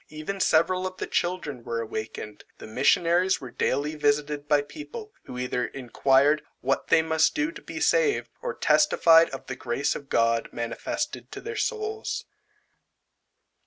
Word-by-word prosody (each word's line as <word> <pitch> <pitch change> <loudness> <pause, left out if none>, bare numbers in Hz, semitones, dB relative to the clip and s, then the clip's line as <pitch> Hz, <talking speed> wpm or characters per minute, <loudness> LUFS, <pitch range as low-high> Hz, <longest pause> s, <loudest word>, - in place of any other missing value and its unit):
Even 155 +6 -5
several 185 +2 +2
of 185 0 -9
the - - -3
children 165 -8 -2
were 115 -1 -3
awakened. 110 -2 -6
The - - -10
missionaries 170 - +2
were 130 -4 -9
daily 145 +6 0
visited 145 0 0
by 145 -1 +3
people, 430 - -9
who 125 - -8
either 125 0 -1
inquired 135 +3 +2 0.2
"what 135 +1 0
they 160 - +4
must 160 0 +2
do 310 0 0
to 330 - -11
be - - -7
saved," 485 -4 +2
or 485 -2 -3
testified 165 - +5
of 135 - -8
the 130 - -5
grace 125 +3 -1
of 140 -1 -8
God 115 0 +2
manifested 120 - -4
to - - -6
their 455 -1 -6
souls. 435 -1 -3
150 Hz, 155 wpm, -26 LUFS, 130-185 Hz, 0.2 s, testified